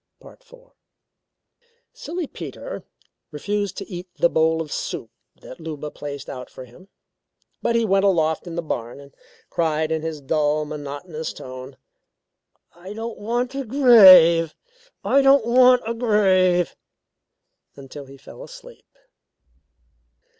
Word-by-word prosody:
IV -, -, -16 dB, 1.5 s
Silly 340 Hz, +3 st, -5 dB
Peter -, -, -8 dB, 0.5 s
refused 200 Hz, +5 st, -3 dB
to 195 Hz, -, -7 dB
eat 180 Hz, -1 st, -8 dB
the 170 Hz, -, +2 dB
bowl 160 Hz, 0 st, +2 dB
of 155 Hz, -3 st, -6 dB
soup 115 Hz, -, -5 dB, 0.3 s
that 130 Hz, -, -12 dB
Luba 150 Hz, -2 st, -7 dB
placed 140 Hz, -2 st, -8 dB
out 125 Hz, -1 st, -8 dB
for 130 Hz, -, -11 dB
him, 125 Hz, +11 st, -18 dB, 0.7 s
but 235 Hz, -, 0 dB
he 230 Hz, -1 st, +2 dB
went 195 Hz, -1 st, +2 dB
aloft 160 Hz, -4 st, +1 dB
in 170 Hz, -, -7 dB
the 170 Hz, -, -3 dB
barn 120 Hz, -4 st, -5 dB
and 140 Hz, -1 st, -15 dB, 0.4 s
cried 160 Hz, -1 st, -1 dB
in 160 Hz, -1 st, -1 dB
his 160 Hz, -1 st, -5 dB
dull, 150 Hz, +1 st, 0 dB
monotonous 150 Hz, +2 st, -7 dB
tone: 130 Hz, +1 st, -10 dB, 1.0 s
"I 185 Hz, +4 st, -11 dB
don't 225 Hz, +1 st, -7 dB
want 240 Hz, +4 st, -2 dB
a 275 Hz, 0 st, -4 dB
grave 190 Hz, -, +7 dB, 0.5 s
I 275 Hz, -, +3 dB
don't 270 Hz, -3 st, +4 dB
want 250 Hz, +1 st, +5 dB
a 230 Hz, -, -2 dB
grave," 190 Hz, -6 st, +2 dB, 1.0 s
until 140 Hz, +1 st, -11 dB
he 135 Hz, +1 st, -14 dB
fell -, -, -14 dB
asleep. -, -, -14 dB
170 Hz, 130 wpm, -22 LUFS, 150-220 Hz, 1.5 s, grave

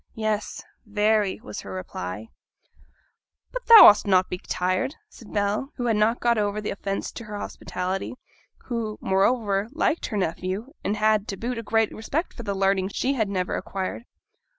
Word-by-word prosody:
'Yes, 215 Hz, -1 st, -2 dB, 0.2 s
very,' 210 Hz, -1 st, +1 dB
was 105 Hz, -, -7 dB
her 100 Hz, -, -9 dB
reply. 95 Hz, +3 st, -6 dB, 1.2 s
'But -, -, -6 dB
thou 460 Hz, -1 st, +11 dB
ought'st 210 Hz, -, +7 dB
not 185 Hz, -2 st, +5 dB
to -, -, -29 dB
be 180 Hz, -, -4 dB
tired,' 185 Hz, +12 st, -1 dB
said 230 Hz, -, -14 dB
Bell, 210 Hz, +7 st, -1 dB
who 245 Hz, -, -3 dB
had 230 Hz, -2 st, +2 dB
not 215 Hz, +2 st, +3 dB
yet -, -, -25 dB
got 235 Hz, -1 st, +3 dB
over 205 Hz, 0 st, 0 dB
the 210 Hz, -, -3 dB
offence 195 Hz, 0 st, -3 dB
to 230 Hz, -, -9 dB
her 210 Hz, -1 st, -6 dB
hospitality; 185 Hz, +1 st, -4 dB, 0.5 s
who, 225 Hz, -3 st, -3 dB
moreover, 200 Hz, +1 st, +1 dB
liked 320 Hz, +1 st, 0 dB
her 210 Hz, -, -3 dB
nephew, 190 Hz, -, -3 dB
and 210 Hz, -, -1 dB
had, 215 Hz, -1 st, +2 dB
to 195 Hz, -, -4 dB
boot, 240 Hz, +3 st, -3 dB
a -, -, -3 dB
great 225 Hz, 0 st, +1 dB
respect 280 Hz, +10 st, -3 dB
for -, -, -8 dB
the 200 Hz, -3 st, -3 dB
learning 195 Hz, -1 st, +2 dB
she 255 Hz, +7 st, -1 dB
had 220 Hz, -6 st, 0 dB
never 185 Hz, -2 st, -1 dB
acquired. 195 Hz, +4 st, -4 dB
210 Hz, 180 wpm, -25 LUFS, 195-230 Hz, 1.2 s, thou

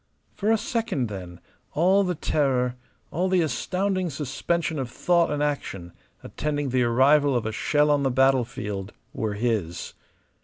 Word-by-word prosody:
For 210 Hz, +1 st, -1 dB
a 225 Hz, -, +4 dB
second, 215 Hz, -, -2 dB
then, 90 Hz, -4 st, -8 dB, 0.3 s
all 185 Hz, +6 st, +4 dB
the 180 Hz, -2 st, -1 dB
terror, 130 Hz, -5 st, 0 dB, 0.4 s
all 180 Hz, +4 st, 0 dB
the 185 Hz, -1 st, +3 dB
astounding 185 Hz, +3 st, -1 dB
suspension 150 Hz, +2 st, -2 dB
of 130 Hz, -2 st, -3 dB
thought 170 Hz, +6 st, +2 dB
and 150 Hz, 0 st, -1 dB
action 95 Hz, -12 st, -3 dB, 0.3 s
attending 145 Hz, -2 st, -2 dB
the 130 Hz, 0 st, +1 dB
arrival 135 Hz, +4 st, +4 dB
of 120 Hz, -2 st, 0 dB
a 110 Hz, -, -1 dB
shell 150 Hz, +6 st, +2 dB
on 145 Hz, -1 st, +3 dB
the 135 Hz, -, +2 dB
battlefield 120 Hz, -6 st, 0 dB, 0.2 s
were 110 Hz, -2 st, -2 dB
his. 105 Hz, -7 st, -2 dB
140 Hz, 150 wpm, -25 LUFS, 120-170 Hz, 0.4 s, a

